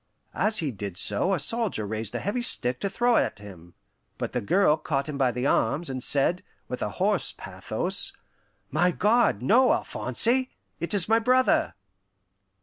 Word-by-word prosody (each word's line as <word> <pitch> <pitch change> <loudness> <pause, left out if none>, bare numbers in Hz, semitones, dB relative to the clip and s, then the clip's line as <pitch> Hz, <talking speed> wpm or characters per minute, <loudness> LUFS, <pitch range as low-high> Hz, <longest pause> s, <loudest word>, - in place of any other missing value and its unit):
As 215 0 0
he 150 -4 -2
did 100 -4 -7
so 105 - +2
a - - -4
soldier 225 - 0
raised 110 +1 -4
a - - -1
heavy 210 +5 -2
stick 125 - 0
to 200 - -2
throw 240 +3 +2
at - - 0
him; 90 -4 -13 0.4
but - - -4
the 125 - -2
girl 165 - +3
caught 140 -3 -3
him 150 - -5
by 135 -3 +1
the 125 +2 -4
arms, 140 +1 0
and 130 -1 -4
said, 145 +8 +2 0.3
with - - -6
a - - -1
hoarse - - +1
pathos, - - -1 0.6
"My 180 - +2
God, 210 - +1
no, 250 - +4
Alphonse! 255 +3 +1 0.3
It 170 +5 -3
is 185 -4 +2
my 225 +1 +3
brother!" 255 +2 +2
160 Hz, 170 wpm, -25 LUFS, -, 0.6 s, no